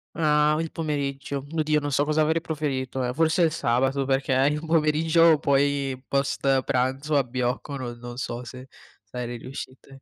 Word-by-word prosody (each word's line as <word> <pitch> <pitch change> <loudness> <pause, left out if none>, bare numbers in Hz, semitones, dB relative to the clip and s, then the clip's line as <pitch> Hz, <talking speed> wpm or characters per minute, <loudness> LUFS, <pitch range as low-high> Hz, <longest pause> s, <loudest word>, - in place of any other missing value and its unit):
Ah, 150 -1 +3
il 165 -1 -3
pomeriggio, 140 -3 -3
oddio 155 -1 +1
non 145 0 -4
so 140 +2 +2
cosa 155 +1 +1
avrei 160 +2 +2
proferito, 135 -5 -3
ehm, 125 - -1
forse 160 +4 +2
il 165 -2 +4
sabato, 135 +2 0
perché 135 0 0 0.2
il 150 +1 -3
pomeriggio 160 0 +3
poi, 140 -1 +1
post 135 -1 +1
pranzo, 135 +4 0
abbiocco, 125 +2 -2
no 120 -2 -5
non 120 0 -9
so 120 -1 -4
se 130 +2 -10 0.4
sarei 120 -1 -6
riuscite. 135 +1 -10
140 Hz, 155 wpm, -25 LUFS, 130-155 Hz, 0.4 s, il